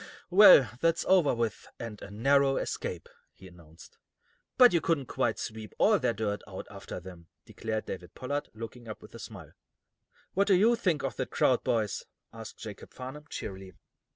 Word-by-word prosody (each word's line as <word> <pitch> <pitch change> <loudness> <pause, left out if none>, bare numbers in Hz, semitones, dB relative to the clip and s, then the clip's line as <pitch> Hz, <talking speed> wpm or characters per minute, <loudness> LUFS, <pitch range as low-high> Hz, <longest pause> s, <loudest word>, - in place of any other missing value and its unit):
"Well, 180 -9 +9
that's 165 0 +2
over 180 -9 +4
with, 115 -1 -3
and 110 -3 -7
a - - -8
narrow 135 +6 +3
escape," - - -4 0.3
he 95 - -14
announced. 85 -2 -17 0.6
"But 250 -4 +8
you 170 - +3
couldn't 155 -5 0
quite 120 -2 -1
sweep 110 -1 -7
all 210 -2 +4
their - - +1
dirt 105 -2 -2
out 95 -2 -7
after 100 -2 -8
them," 90 -2 -12 0.2
declared 110 -1 -4
David 90 -2 -8
Pollard, 145 +3 -3
looking 115 +2 -9
up 110 - -8
with - - -14
a - - -10
smile. - - -10 0.8
"What 200 +2 +2
do 195 - +5
you 220 +6 +4
think 180 -10 0
of 130 -6 -3
that - - -3
crowd, - - +2
boys?" 110 -3 -1 0.3
asked 115 -1 -9
Jacob 105 -3 -9
Farnum, 130 +4 -8
cheerily. 95 -1 -7
115 Hz, 175 wpm, -29 LUFS, 100-150 Hz, 0.8 s, Well